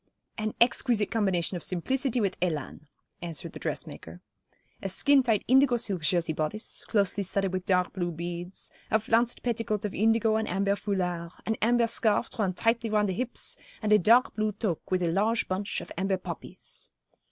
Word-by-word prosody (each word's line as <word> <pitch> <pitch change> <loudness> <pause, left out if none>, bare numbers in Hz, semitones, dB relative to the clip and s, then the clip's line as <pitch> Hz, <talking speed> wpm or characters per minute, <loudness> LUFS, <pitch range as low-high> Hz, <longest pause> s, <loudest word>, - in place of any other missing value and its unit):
'An 215 -1 -3
exquisite 235 -2 +3
combination 190 -5 +1
of 170 - -8
simplicity 255 - 0
with 200 -4 0
élan,' 155 -3 -3 0.3
answered 170 -4 -6
the - - -8
dressmaker. 80 +2 -5 0.6
'A 195 - -3
skin 280 +8 +4
tight 225 -5 +1
indigo 260 -1 +5
silk 195 -6 -1
Jersey 170 -1 +1
bodice, 155 +8 -3
closely 200 -1 +1
studded 195 0 0
with 185 -1 -3
dark 180 -1 +2
blue 175 -3 -2
beads, 175 +2 -5 0.2
a 220 - +3
flounced 230 +2 +1
petticoat 230 -3 -1
of 205 - -3
indigo 220 +1 +3
and 220 - -1
amber 200 +2 +1
foulard, 180 -5 -2
an 220 - 0
amber 235 +1 +4
scarf 230 -2 +2
drawn 200 -4 0
tightly 225 +4 0
round 210 -1 +2
the - - 0
hips, 245 +5 -1 0.2
and 215 -1 +2
a 210 - +7
dark 235 +7 +4
blue 215 -1 0
toque 195 -5 -3
with 185 -1 +1
a 170 - +1
large 215 +6 +1
bunch 195 +2 -2
of - - -11
amber 190 0 +1
poppies. 185 - -7
205 Hz, 175 wpm, -28 LUFS, 180-225 Hz, 0.6 s, a